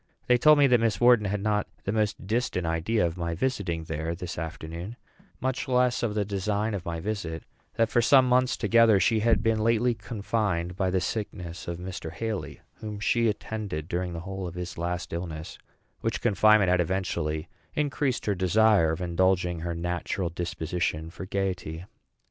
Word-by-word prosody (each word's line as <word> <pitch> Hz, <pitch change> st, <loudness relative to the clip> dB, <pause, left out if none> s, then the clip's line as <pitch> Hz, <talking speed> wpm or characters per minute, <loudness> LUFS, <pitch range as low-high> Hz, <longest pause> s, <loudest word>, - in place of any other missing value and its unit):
They 125 Hz, 0 st, +4 dB
told 150 Hz, +3 st, +7 dB
me 145 Hz, -, +6 dB
that 125 Hz, -3 st, +5 dB
Miss 110 Hz, -4 st, +1 dB
Wharton 120 Hz, -4 st, +5 dB
had 100 Hz, 0 st, -2 dB
not 105 Hz, -1 st, +1 dB, 0.2 s
the 100 Hz, -, -1 dB
most 105 Hz, -2 st, -1 dB
distant 110 Hz, -4 st, -1 dB
idea 85 Hz, +6 st, +1 dB
of 85 Hz, +1 st, -3 dB
my 85 Hz, -1 st, -2 dB
visiting 90 Hz, -7 st, -1 dB
there 80 Hz, +1 st, -3 dB
this 90 Hz, -1 st, -6 dB
afternoon, 85 Hz, +5 st, -6 dB, 0.4 s
much 130 Hz, +2 st, -2 dB
less 125 Hz, -1 st, +2 dB
of 110 Hz, -3 st, -1 dB
the 105 Hz, -1 st, +1 dB
design 105 Hz, +2 st, -1 dB
of 100 Hz, -4 st, -3 dB
my 85 Hz, -1 st, -4 dB
visit; 80 Hz, -4 st, -4 dB, 0.3 s
that 115 Hz, 0 st, +3 dB
for 120 Hz, -, +4 dB
some 130 Hz, +2 st, +6 dB
months 125 Hz, 0 st, +3 dB
together 115 Hz, -1 st, +5 dB
she 110 Hz, +4 st, +3 dB
had 110 Hz, -1 st, +2 dB
been 115 Hz, -1 st, +2 dB
lately 115 Hz, +2 st, +2 dB
confined 100 Hz, -6 st, -2 dB
by 95 Hz, -1 st, 0 dB
the 95 Hz, 0 st, +1 dB
sickness 90 Hz, -3 st, -4 dB
of 85 Hz, -1 st, -3 dB
Mr. 90 Hz, -2 st, -6 dB
Haly, 110 Hz, +3 st, -4 dB, 0.2 s
whom 105 Hz, -1 st, -6 dB
she 115 Hz, +2 st, +2 dB
attended 105 Hz, -7 st, -3 dB
during 90 Hz, 0 st, -2 dB
the 85 Hz, -, -5 dB
whole 95 Hz, 0 st, -5 dB
of 85 Hz, -, -8 dB
his 90 Hz, 0 st, -5 dB
last 85 Hz, +1 st, -3 dB
illness; 80 Hz, -2 st, -5 dB, 0.4 s
which -, -, -2 dB
confinement 105 Hz, -1 st, +4 dB
had 90 Hz, -1 st, +4 dB
eventually 85 Hz, -3 st, -2 dB, 0.3 s
increased 145 Hz, -3 st, 0 dB
her 105 Hz, -, +2 dB
desire 95 Hz, -1 st, +4 dB
of 80 Hz, -, -5 dB
indulging 90 Hz, 0 st, +1 dB
her 85 Hz, +1 st, -3 dB
natural 85 Hz, +1 st, -2 dB
disposition 80 Hz, -1 st, -3 dB
for 95 Hz, -, -8 dB
gayety. 90 Hz, -4 st, -3 dB
95 Hz, 180 wpm, -27 LUFS, 85-110 Hz, 0.4 s, told